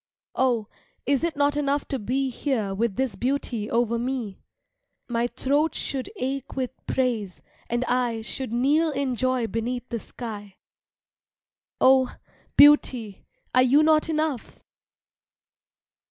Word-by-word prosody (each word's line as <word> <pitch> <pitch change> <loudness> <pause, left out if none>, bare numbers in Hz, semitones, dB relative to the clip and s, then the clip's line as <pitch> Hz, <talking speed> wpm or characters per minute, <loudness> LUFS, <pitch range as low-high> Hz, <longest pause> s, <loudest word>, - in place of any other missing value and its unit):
Oh, 240 -5 +1 0.4
is 275 +2 +1
it 335 -2 0
not 285 0 +2
enough 285 -1 0
to 270 - -1
be 260 +5 -1
Here 230 -6 -1
with 215 0 -1
this 260 -6 -1
beauty 240 -2 -2
over 235 0 +1
me? 240 -5 -4 0.7
My 235 0 0
throat 285 +6 0
should 270 +3 -3
ache 270 - -4
with 260 -2 -2 0.2
praise, 230 -8 -1 0.3
and 240 +2 0
I 245 -3 0
Should 260 +1 -5
kneel 285 +7 +2
in 275 -3 -1
joy 255 -1 0
beneath 240 +3 -3
the 235 - -3
sky. 205 -4 -8 1.2
Oh, 260 0 +4 0.4
beauty 255 -8 +5 0.3
are 255 - +5
you 270 +4 +5
not 310 0 +3
enough? 305 -6 -2
255 Hz, 125 wpm, -25 LUFS, 235-275 Hz, 1.2 s, beauty